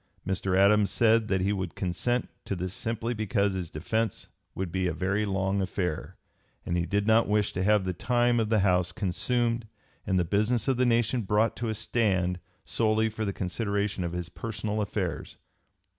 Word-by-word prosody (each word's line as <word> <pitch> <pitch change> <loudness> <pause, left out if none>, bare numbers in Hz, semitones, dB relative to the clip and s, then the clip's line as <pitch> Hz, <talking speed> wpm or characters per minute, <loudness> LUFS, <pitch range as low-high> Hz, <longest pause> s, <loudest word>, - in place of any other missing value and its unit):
Mr. 95 0 0
Adams 100 +1 +5
said 115 +1 +3
that 95 -3 +1
he 100 +2 +1
would 95 -3 -4
consent 110 +7 -1 0.2
to 100 - -3
this 90 +1 -4
simply 115 +2 -2
because 100 -2 0
his 90 -3 -4
defence 110 +9 -2 0.3
would 95 -2 -3
be 95 +1 0
a 90 - -1
very 100 +5 0
long 95 0 0
affair, 90 -3 -3 0.5
and 85 - -1
he 85 0 0
did 100 0 0
not 110 +1 +4
wish 105 -1 +1
to 90 - -2
have 105 -1 +3
the 90 - -1
time 120 +5 +2
of 110 -2 0
the 110 -2 +3
House 90 -2 +2
consumed 115 +5 0 0.4
and 95 - +2
the 90 - +2
business 110 +6 +1
of 135 -2 +2
the 125 0 +3
nation 120 +1 +2
brought 105 +2 +1
to 115 -1 -3
a 110 - -2
stand 95 -5 0 0.3
solely 110 0 +1
for 110 0 -4
the 100 - -1
consideration 100 +1 -2
of 85 0 -3
his 90 -1 -3
personal 110 0 -3
affairs. 100 - -3
100 Hz, 190 wpm, -28 LUFS, 95-110 Hz, 0.5 s, Adams